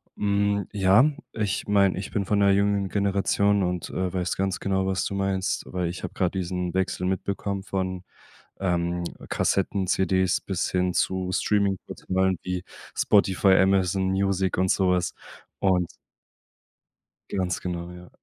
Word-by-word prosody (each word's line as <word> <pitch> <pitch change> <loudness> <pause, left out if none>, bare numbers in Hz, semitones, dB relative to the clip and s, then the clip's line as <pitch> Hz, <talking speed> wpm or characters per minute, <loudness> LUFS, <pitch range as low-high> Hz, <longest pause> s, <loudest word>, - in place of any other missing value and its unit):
Hm, 100 -1 +1
ja, 100 +8 +5 0.2
ich 105 -3 -2
meine, 100 -2 +3
ich 95 - -5
bin 100 - -1
von 105 +1 +1
'ner 100 -1 +5
jüngeren 100 -1 +2
Generation 100 0 +2
und, 90 -1 -2
äh, 95 0 -2
weiß 90 -1 -1
ganz 95 -1 -1
genau, 95 -1 0
was 95 -1 0
du 100 - -3
meinst. 95 -1 -1
Weil 90 -2 -2
ich 90 - -7
habe - - -5
grad 95 0 -1
diesen 90 -1 -2
Wechsel 90 -1 0
mitbekommen 100 +1 -2
von, 95 -2 -3 0.6
ähm, 90 -2 0 0.3
Kassetten, 95 0 0
CDs 95 0 +1
bis 95 -3 -2
hin 90 -1 +1
zu 95 -1 0
Streaming-Portalen 95 -2 0
wie 90 -1 -3 0.3
Spotify, 95 -1 +4
Amazon 95 0 +3
Music 95 -1 0
und 95 0 +2
so 95 -2 +2
was. 90 -1 +1 0.5
Und 90 -3 +1 1.5
Ganz 90 -1 -1
genau, 90 -1 -4
ja. 90 0 -12
95 Hz, 145 wpm, -25 LUFS, 90-100 Hz, 1.5 s, ja